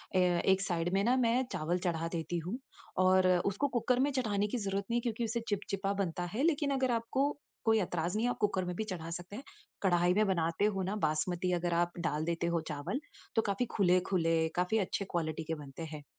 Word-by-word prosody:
अ, - - +5
एक 180 +1 +3
साइड 175 -3 0
में 195 +1 +3
ना 245 +4 +3
मैं 245 0 +3
चावल 165 +3 0
चढ़ा 165 -1 0
देती 170 +1 -2
हूँ, 225 +7 -2 0.4
और 185 0 +5
अ, 180 -1 +5
उसको 205 +9 +1
कुकर 250 -1 +1
में 280 +2 +3
चढ़ाने 210 -6 0
की 230 - -2
ज़रूरत 200 -2 -2
नहीं 235 - +2
है - - -5
क्योंकि 235 0 -2
उसे 230 +1 -1
चिपचिपा 195 -1 -1
बनता 175 -1 -3
है 255 - 0
लेकिन 295 -3 +2
अगर 260 -2 +1
आपको 240 +5 +1 0.4
कोई 220 0 +5
ऐतराज़ 175 0 -1
नहीं 225 - +1
है, 245 - +2
आप - - -4
कुकर 195 -3 +1
में 180 - -3
भी 220 - -1
चढ़ा 180 -6 -5
सकते 175 +4 -6
हैं। 260 - -7 0.4
कढ़ाई 175 -1 +4
में 215 +3 +3
बनाते 170 +1 +1
हो 195 -2 +1
ना 195 +3 -2
बासमती 175 +4 0
अगर 175 0 0
आप 175 0 0
डाल 155 -2 -1
देते 170 0 -1
हो 165 - +1
चावल, 150 - -3 0.4
तो 225 - +5
काफ़ी 200 +3 0
खुले-खुले, 175 -4 +3
काफ़ी 180 +5 +1
अच्छे 200 +1 -1
क्वालिटी 160 -2 -1
के 160 +1 -3
बनते 145 +1 -8
हैं। 150 -1 -7
185 Hz, 220 wpm, -32 LUFS, 170-220 Hz, 0.4 s, अ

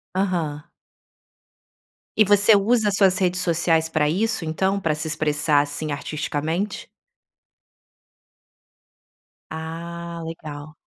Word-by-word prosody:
Aham. 170 -6 -1 1.6
E 215 - +6
você 205 +2 +5
usa 210 +1 +3
suas 195 -2 +3
redes 180 -1 +1
sociais 165 -2 +1
para 155 -2 +1
isso, 210 +3 0
então, 190 +5 0
para 165 -5 0
se 150 +1 -4
expressar, 150 -1 +1
assim, 145 +1 -4
artisticamente? 155 +6 -3 2.6
Ah, 170 +1 -6
legal. 155 -2 -8
165 Hz, 95 wpm, -23 LUFS, 155-190 Hz, 2.6 s, E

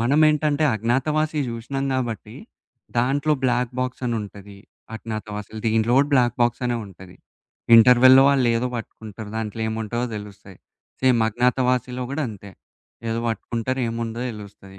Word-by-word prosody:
మనం 135 +6 +2
ఏంటంటే 150 0 +1
'అజ్ఞాతవాసి' 150 +7 0
జూశినాం 120 +4 -4
కాబట్టి, 115 -4 -4 0.6
దాంట్లో 140 +5 +1
బ్లాక్ 125 -1 +1
బాక్సనుంటది. 105 -6 -5 0.4
'అజ్ఞాతవాసిలో' 110 -1 -7
దీంట్లో 110 +2 +2
గూడా 140 +1 +3
బ్లాక్ 120 -3 +2
బాక్సనే 120 0 0
ఉంటది. 95 -1 -14 0.6
ఇంటర్వల్‌లో 125 +3 +7
వాళ్ళేదో 125 -3 +2
పట్టుకుంటరు, 110 -2 -8
దాంట్లో 110 0 -4
ఏముంటదో 110 +2 -3
తెలుస్తాయి. 100 -2 -11 0.4
సేమ్ 130 -3 +4
'అజ్ఞాతవాసిలో' 125 +1 0
గూడా 155 - -2
అంతే 100 -2 -10 0.6
ఏదో 115 0 -1
వట్టుకుంటారు 120 +3 -3
ఏముందో 115 0 -4
తెలుస్తది. 100 -3 -12
120 Hz, 115 wpm, -23 LUFS, 110-130 Hz, 0.6 s, ఇంటర్వల్‌లో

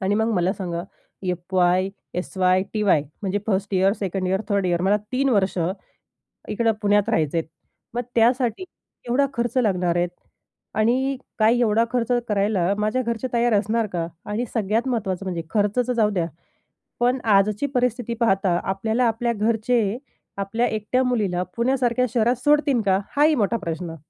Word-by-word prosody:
आणि 195 +1 +1
मग 220 +2 +1
मला 180 +1 +1
सांगा? 175 -4 -4 0.4
FY, 180 0 +1 0.3
SY, 185 0 +1
TY. 205 -9 +2 0.2
म्हणजे 200 0 0
1st 200 -1 -1
year, 190 +1 +3
2nd 190 -3 -3
year, 190 +2 +1
3rd 200 -2 +1
year 175 -1 0
मला 200 +2 +3 0.2
3 270 +2 +1
वर्ष 195 -5 +1 0.9
इकडं 225 +1 +1
पुण्यात 205 +1 +2
राहायचे 160 -6 +1
आहेत. 160 - -1 0.5
मग 245 - -1
त्यासाठी 240 - +2 0.5
एवढा 280 +4 +3
खर्च 240 0 -2
लागणार 180 -7 +1
आहेत. 175 0 +1 0.7
आणि 255 +5 +1 0.2
काय 225 +3 +4
एवढा 225 0 +3
खर्च 245 -1 0 0.2
करायला 200 -3 +1
माझ्या 215 +5 0
घरचे 235 +1 -2
तयार 235 0 +2
असणार 215 +2 +1
का? 165 -1 -1 0.2
आणि 215 +4 -2
सगळ्यात 225 +3 0
महत्त्वाचं 200 -6 -2
म्हणजे 175 -3 -3
खर्चाच 210 +5 +1
जाऊ 215 -2 +3
द्या. 175 -5 -1 0.7
पण 245 +2 +2 0.2
आजची 210 +6 +2
परिस्थिती 245 -1 0
पाहता 195 -5 +2
आपल्याला 220 +6 0
आपल्या 235 +2 0
घरचे 220 0 +1 0.4
आपल्या 210 +5 0
एकट्या 220 +4 0
मुलीला 205 -8 0
पुण्यासारख्या 250 0 +1
शहरात 240 +2 +3
सोडतील 290 -4 +3
का? 190 0 +4 0.2
हाही 300 +2 +5
मोठा 230 -1 +1
प्रश्न. 170 -4 -5
210 Hz, 150 wpm, -23 LUFS, 190-235 Hz, 0.9 s, हाही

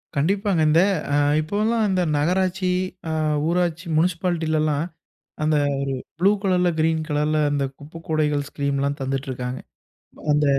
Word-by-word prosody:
கண்டிப்பாங்க. 190 +4 +1
இந்த 160 +3 +5 0.3
அ - - +3 0.3
இப்போல்லாம் 215 +7 0
இந்த 185 -1 +1 0.2
நகராட்சி 185 +4 +1 0.4
அ - - -1 0.3
ஊராட்சி 170 0 0
முனிசிபாலிட்டிலல்லாம் 160 -3 +1 0.6
அந்த 155 0 +2 0.2
ஒரு 135 - -2 0.4
ப்ளூ 190 +3 +5
கலர்‌ல, 180 -3 +2
கிரீன் 160 0 +2
கலர்‌ல 150 +1 +1
அந்த 145 -1 0
குப்பக்கூடைகள் 150 -1 -2
ஸ்கீம்ல்லாம் 140 0 -1
தந்துட்ருக்காங்க. 130 -1 -3 0.7
அந்த 150 0 +3
160 Hz, 115 wpm, -23 LUFS, 145-180 Hz, 0.7 s, இந்த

